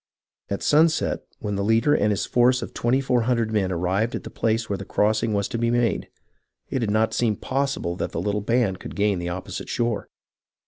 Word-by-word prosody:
At 100 - -3
sunset, 160 +2 +3 0.2
when 105 - -4
the 100 - -1
leader 115 +7 +3
and 105 -7 +2
his 100 -2 0
force 125 +1 +3
of - - -8
twenty 120 +3 +1
four 125 -2 +2
hundred 115 -2 0
men 100 -4 +1
ar 90 - -1
rived 95 +7 0
at - - -5
the - - -8
place 115 0 0
where 100 -2 -2
the - - -5
crossing 110 +3 +1
was 100 -1 0
to 120 -3 -3
be 115 0 +1
made, 120 -2 0 0.6
it 130 - 0
did 115 -4 -1
not 110 +1 +2
seem 115 -3 +1
possible 135 -11 -2
that - - -3
the - - -3
little 105 +3 -1
band 110 -3 +1
could - - -8
gain 100 -2 +1
the 85 0 -3
opposite 90 +1 -6
shore. 115 -3 -1
110 Hz, 220 wpm, -24 LUFS, 100-120 Hz, 0.6 s, sunset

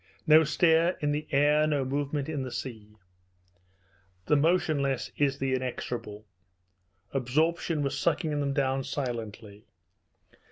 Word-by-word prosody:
No 160 0 +7
stir 165 +3 +3
in 145 -1 0
the 150 +1 -3
air, 150 +2 +3
no 145 -3 0
movement 140 +1 -2
on 155 -3 -3
the 130 - -4
sea. 110 -5 -7 1.3
The 150 - +3
motionless 145 -4 +1
is 140 -1 +1
the 135 -1 -1
inexorable. 120 -4 -4 0.9
Absorption 150 +4 0
was 140 - -2
sucking 165 -1 0
them 140 -1 0
down 135 -1 0
silently. 115 -6 -6
140 Hz, 120 wpm, -28 LUFS, 130-155 Hz, 1.3 s, No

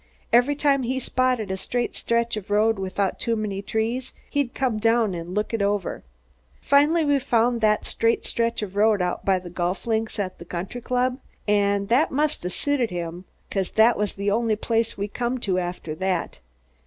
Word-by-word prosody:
Every 245 +5 +5
time 280 -1 +2
he 260 +1 -1
spotted 255 -5 0
a 190 - -2
straight 240 +5 -2
stretch 235 0 0
of 210 -2 -7
road 215 +1 +3
without 190 0 -1
too 230 - 0
many 205 -3 -3
trees, 230 +5 -2 0.2
he'd 285 -4 -1
come 250 -5 0
down 225 -2 +2
and 175 +2 -6
look 210 +2 -1
it 225 - 0
over. 200 -2 -1 0.6
Finally 300 +4 +4
we 285 -1 +3
found 240 -2 +1
that 215 -1 +2
straight 230 0 +1
stretch 230 -1 0
of 195 -2 -6
road 210 0 +4
out 180 - -2
by 195 -1 +3
the 180 -1 -8
golf 175 +1 -2
links 225 -1 -1
at 190 -3 -3
the - - -8
country 190 +8 -5
club, 250 +2 0 0.3
an' 200 -1 +2
that 245 +9 +3
must 300 - 0
'a' 180 - -2
suited 260 +4 0
him 175 0 -5 0.3
'cause 195 -2 -1
that 225 +2 +5
was 210 -1 -2
the 200 +1 -1
only 225 0 +1
place 225 +1 0
we 200 +1 -2
come 240 +4 -2
to 185 -4 +1
after 175 -3 -4
that. 185 +1 -2
220 Hz, 190 wpm, -24 LUFS, 195-245 Hz, 0.6 s, Every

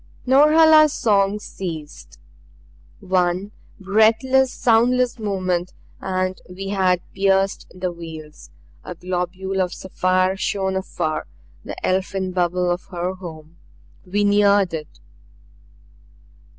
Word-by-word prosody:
Norhala's 305 +3 +6
song 200 -3 +2
ceased. 165 -7 -8 0.8
One 185 +1 0 0.3
breathless, 225 +6 +3
soundless 245 +1 +2
moment 185 -4 -2 0.3
and 185 0 -2
we 195 +2 -7
had 185 -3 +1
pierced 195 0 +1
the 185 0 -4
veils. 160 -3 -10 0.3
A 180 - -7
globule 185 +2 -3
of 180 -1 -2
sapphire 185 0 0
shone 190 -1 -2
afar, 185 -4 -3 0.4
the - - -7
elfin 190 0 -1
bubble 180 0 0
of 175 +1 -3
her 180 0 -4
home. 165 -3 -11 0.5
We 205 +3 -1
neared 205 -2 +3
it. 150 - -7
190 Hz, 100 wpm, -21 LUFS, 180-205 Hz, 0.8 s, Norhala's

